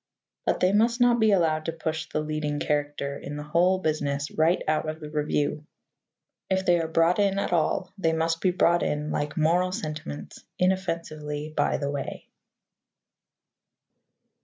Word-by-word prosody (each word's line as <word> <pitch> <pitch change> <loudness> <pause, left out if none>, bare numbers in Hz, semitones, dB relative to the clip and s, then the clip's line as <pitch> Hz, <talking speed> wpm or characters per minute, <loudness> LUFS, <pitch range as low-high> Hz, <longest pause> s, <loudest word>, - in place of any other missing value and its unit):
But - - +1
they 185 +2 +4
must 230 +3 +3
not 245 -1 +4
be 220 -1 +4
allowed 160 -5 +2
to 165 - -1
push 160 -1 -4
the 155 - -1
leading 150 -1 -2
character 145 -1 -1
in 145 - -7
the 150 - -5
whole 175 +5 +3
business 145 -4 -1
right 160 +3 +2
out 155 0 +1
of 155 0 -5
the 150 -1 -8
review. 150 0 -1 0.8
If 190 0 +1
they 175 -1 +4
are 165 - -2
brought 165 +3 +3
in 200 -1 +2
at 200 - -1
all, 175 +2 0
they 165 -3 +2
must 165 0 0
be 185 - +3
brought 175 -1 +3
in, 150 +1 -1
like 145 0 -2
moral 175 +4 +2
sentiments, 150 - -6
inoffensively 155 -5 -2
by - - +2
the 140 -1 -2
way. 140 -1 -5
160 Hz, 160 wpm, -26 LUFS, 150-180 Hz, 0.8 s, they